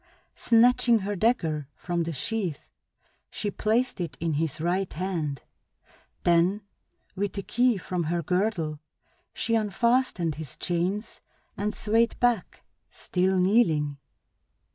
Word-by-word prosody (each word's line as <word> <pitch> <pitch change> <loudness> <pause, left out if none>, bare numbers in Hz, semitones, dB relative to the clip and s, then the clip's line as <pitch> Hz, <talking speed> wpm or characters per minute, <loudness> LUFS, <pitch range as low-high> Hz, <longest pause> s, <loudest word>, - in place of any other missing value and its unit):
Snatching 240 0 +4
her 205 0 -3
dagger 165 - 0
from 175 -1 -2
the 165 0 -2
sheath 175 - -3 0.6
she 205 - -3
placed 220 +1 0
it 170 - -5
in 165 -1 -1
his 155 0 -1
right 180 +3 0
hand; 160 -6 -3 0.8
then, 175 +4 +3 0.5
with 200 +1 -2
a 200 - -2
key 245 +1 +2
from 180 -2 -3
her 170 +2 -1
girdle, 180 -4 -1 0.5
she 230 - -2
unfastened 220 -4 +1
his 150 -3 -7
chains 185 +5 -2 0.3
and 210 +1 -2
swayed 225 +2 +1
back, 240 -6 0 0.3
still 185 +1 0
kneeling. 165 -8 +2
185 Hz, 120 wpm, -27 LUFS, 165-220 Hz, 0.8 s, Snatching